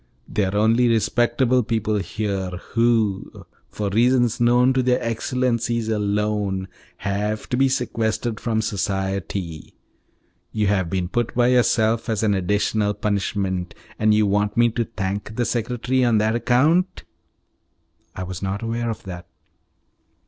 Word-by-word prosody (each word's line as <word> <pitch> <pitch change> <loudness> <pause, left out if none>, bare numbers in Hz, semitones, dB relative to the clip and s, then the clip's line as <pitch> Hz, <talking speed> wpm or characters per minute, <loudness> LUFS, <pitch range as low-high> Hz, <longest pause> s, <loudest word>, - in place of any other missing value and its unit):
They 105 - 0
are 95 +2 -3
only 115 +4 +3
respectable 120 +2 +2
people 110 -2 -1
here, 100 -2 -3 0.2
who, 115 -4 0 0.2
for 105 -1 -3
reasons 120 +2 +3
known 125 +2 +4
to 130 - +2
their 125 0 +2
excellencies 115 -1 -1
alone, 105 -2 -1 0.3
have 105 +2 -2
to - - 0
be 135 +1 +3
sequestered 115 -3 -1
from 110 -2 -1
society. 95 -5 -3 0.8
You 105 -1 0
have 95 -4 +1
been 90 -1 -1
put 120 +5 -2
by 120 0 +3
yourself 115 -2 +2
as 110 -1 0
an 105 -2 +3
additional 105 +2 0
punishment, 95 -3 -2 0.2
and 110 0 +3
you 105 0 +4
want 105 +1 0
me 120 0 +5
to 115 +1 -1
thank 105 -1 -4
the 120 - 0
secretary 120 +3 0
on 120 -3 +3
that 110 +1 +2
account?" 150 +10 +2 1.1
"I 95 - -4
was 90 -1 -6
not 100 +2 -3
aware 115 +1 -2
of 115 - -5
that." 90 -2 -8
110 Hz, 140 wpm, -22 LUFS, 100-120 Hz, 1.1 s, me